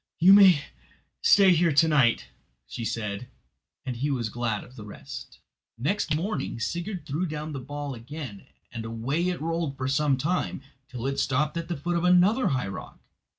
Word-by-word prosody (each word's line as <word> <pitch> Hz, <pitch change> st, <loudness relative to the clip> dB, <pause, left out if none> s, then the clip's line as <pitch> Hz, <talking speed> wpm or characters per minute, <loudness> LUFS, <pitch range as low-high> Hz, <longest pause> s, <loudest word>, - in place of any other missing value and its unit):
"You 180 Hz, +4 st, +7 dB
may 190 Hz, -7 st, +7 dB, 0.6 s
stay 195 Hz, -2 st, +6 dB
here 170 Hz, 0 st, +3 dB
to 155 Hz, +4 st, +5 dB
night," 135 Hz, -7 st, +3 dB, 0.4 s
said 115 Hz, -2 st, -5 dB
she; 105 Hz, +1 st, -4 dB, 0.6 s
and 125 Hz, -, -3 dB
he 135 Hz, +5 st, -1 dB
was 120 Hz, -5 st, -1 dB
glad 115 Hz, -2 st, -2 dB
of 125 Hz, -, -16 dB
the 110 Hz, -, -9 dB
rest. 105 Hz, -, -9 dB, 0.4 s
Next 150 Hz, -, 0 dB
morning 175 Hz, -, -3 dB
Sigurd 175 Hz, -, -3 dB
threw 160 Hz, +6 st, -2 dB
down 155 Hz, 0 st, -5 dB
the 140 Hz, -, -4 dB
ball 145 Hz, +2 st, -5 dB
again 125 Hz, -2 st, -8 dB, 0.2 s
and 115 Hz, -2 st, -6 dB
away 125 Hz, +10 st, -1 dB
it 180 Hz, -, -3 dB
rolled 165 Hz, -3 st, -2 dB
for 130 Hz, -, -2 dB
some 140 Hz, 0 st, +2 dB
time, 150 Hz, -1 st, -2 dB, 0.3 s
till 125 Hz, -1 st, -6 dB
it 135 Hz, 0 st, -1 dB
stopped 150 Hz, +4 st, 0 dB
at 170 Hz, 0 st, -3 dB
the 170 Hz, -2 st, -3 dB
foot 175 Hz, +5 st, -1 dB
of 170 Hz, -, -1 dB
another 180 Hz, +8 st, +4 dB
high 130 Hz, -6 st, 0 dB
rock. 95 Hz, -2 st, -8 dB
145 Hz, 180 wpm, -26 LUFS, 125-170 Hz, 0.6 s, You